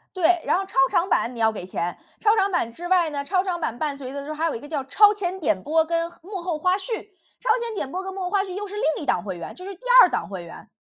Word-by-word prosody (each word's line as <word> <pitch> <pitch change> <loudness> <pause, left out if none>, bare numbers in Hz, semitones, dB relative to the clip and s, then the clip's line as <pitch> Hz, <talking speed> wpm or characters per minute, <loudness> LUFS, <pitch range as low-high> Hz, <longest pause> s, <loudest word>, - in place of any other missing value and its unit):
对， 350 -1 +3
然 - - +3
后 385 - -2
超 385 - -14
长 350 +3 +1
版 245 -7 +1
你 - - -8
要 220 0 +4
给 200 -4 -7
钱， 175 -1 -3 0.2
超 430 0 +4
长 400 -2 +2
版 235 -10 0
之 345 +8 -7
外 355 -3 +3
呢， 285 -2 -3
超 370 +4 +1
长 360 -3 -2
版 240 -8 -3
伴 290 0 -2
随 260 -2 -7
的 280 0 -5
之 290 - -9
后， 310 - -4
还 320 +2 -1
有 330 - 0
一 - - -5
个 290 - -10
叫 290 -3 -2
超 410 +10 +5
前 380 -2 -3
点 205 - 0
播 320 +1 +2
跟 335 +1 -1
幕 375 +2 -6
后 345 -3 -2
花 365 +4 +2
絮， 435 +3 -4 0.4
超 - - -4
前 460 -2 -4
点 270 -9 -3
播 370 +3 -3
跟 385 0 -5
幕 385 - -6
后 360 - -2
花 390 0 +2
絮 380 -2 -7
又 410 +2 -4
是 400 - -8
另 415 -8 0
一 - - -6
档 175 - +1
会 190 -3 -5
员， 170 - -7
这 365 - -10
是 395 - -6
第 - - -27 0.2
2 365 - +7
档 - - -2
会 190 -3 -6
员。 170 - -12
345 Hz, 330 characters per minute, -24 LUFS, 280-385 Hz, 0.4 s, 2